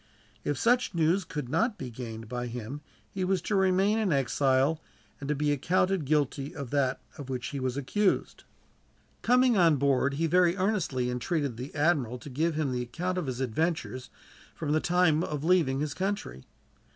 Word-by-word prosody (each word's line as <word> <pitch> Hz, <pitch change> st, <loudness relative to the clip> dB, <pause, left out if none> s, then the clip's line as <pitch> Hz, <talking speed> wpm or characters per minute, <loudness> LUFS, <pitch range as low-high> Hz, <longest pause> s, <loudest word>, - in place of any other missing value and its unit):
If 145 Hz, -, -1 dB
such 245 Hz, -4 st, +2 dB
news 170 Hz, +4 st, +2 dB
could 150 Hz, -5 st, -5 dB
not 205 Hz, -, 0 dB
be 130 Hz, -2 st, -6 dB
gained 115 Hz, -2 st, -7 dB
by 125 Hz, +1 st, -4 dB
him 120 Hz, +4 st, -6 dB, 0.3 s
he 190 Hz, -, -3 dB
was 190 Hz, 0 st, +1 dB
to 210 Hz, -, -1 dB
remain 190 Hz, +3 st, +3 dB
in 210 Hz, -5 st, +1 dB
exile, 135 Hz, +2 st, +2 dB, 0.4 s
and 140 Hz, -, -6 dB
to 150 Hz, -, +1 dB
be 145 Hz, +1 st, +1 dB
accounted 180 Hz, +4 st, +1 dB
guilty 145 Hz, -1 st, 0 dB
of 140 Hz, -4 st, -6 dB
that 135 Hz, -2 st, +1 dB, 0.2 s
of 135 Hz, -2 st, -7 dB
which 125 Hz, -2 st, -3 dB
he 140 Hz, -, -4 dB
was 130 Hz, 0 st, -2 dB
accused. 190 Hz, +9 st, 0 dB, 0.8 s
Coming 250 Hz, 0 st, +4 dB
on 165 Hz, -4 st, +5 dB
board, 140 Hz, 0 st, +2 dB
he 165 Hz, +3 st, 0 dB
very 175 Hz, +2 st, +3 dB
earnestly 185 Hz, -, 0 dB
entreated 135 Hz, +1 st, -1 dB
the 125 Hz, +6 st, -8 dB
admiral 145 Hz, -6 st, +1 dB
to 135 Hz, +3 st, -10 dB
give 160 Hz, +5 st, 0 dB
him 150 Hz, -4 st, 0 dB
the 125 Hz, -1 st, -1 dB
account 175 Hz, +9 st, -3 dB
of 165 Hz, -, -4 dB
his 130 Hz, 0 st, -3 dB
adventures, 130 Hz, -1 st, -2 dB, 0.5 s
from 150 Hz, -3 st, -3 dB
the 155 Hz, -, +3 dB
time 175 Hz, -2 st, +2 dB
of 150 Hz, -3 st, -4 dB
leaving 160 Hz, -6 st, +2 dB
his 150 Hz, -1 st, -2 dB
country. 190 Hz, -, -3 dB
150 Hz, 180 wpm, -28 LUFS, 130-180 Hz, 0.8 s, on